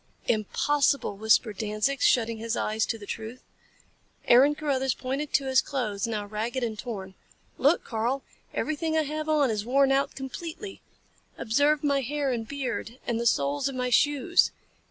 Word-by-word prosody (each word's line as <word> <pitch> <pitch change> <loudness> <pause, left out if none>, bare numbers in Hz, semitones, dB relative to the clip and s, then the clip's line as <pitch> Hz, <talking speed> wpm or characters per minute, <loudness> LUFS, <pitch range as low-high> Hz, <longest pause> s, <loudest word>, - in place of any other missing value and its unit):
"Impossible!" 275 +3 +1
whispered 215 0 +2
Danzig, 215 +5 -1
shutting 230 -2 +2
his 230 +1 -2
eyes 220 +1 0
to 225 - -2
the 210 - -10
truth. 225 +4 -7 0.8
Aaron 270 +5 +6
Carruthers 265 -4 0
pointed 275 +3 -3
to 275 - +2
his 260 -1 +4
clothes, 225 -7 -2
now 215 -2 -3
ragged 225 +5 -3
and 220 -3 -3
torn. 195 -6 -6 0.5
"Look, 290 +6 +3
Karl! 240 +4 -2 0.3
Everything 315 +1 -1
I 315 - +3
have 305 +1 -4
on 290 -5 +3
is 210 -1 -2
worn 270 +3 +3
out 275 +1 +1
completely. 335 +8 -7 0.6
Observe 285 +6 +2
my 280 -1 +2
hair 280 +1 -1
and 230 -2 -3
beard, 255 -3 -4
and 235 -1 -1
the 235 - +1
soles 145 - +1
of 270 - -7
my 250 -1 -1
shoes. 290 +7 +3
255 Hz, 160 wpm, -27 LUFS, 220-285 Hz, 0.8 s, Aaron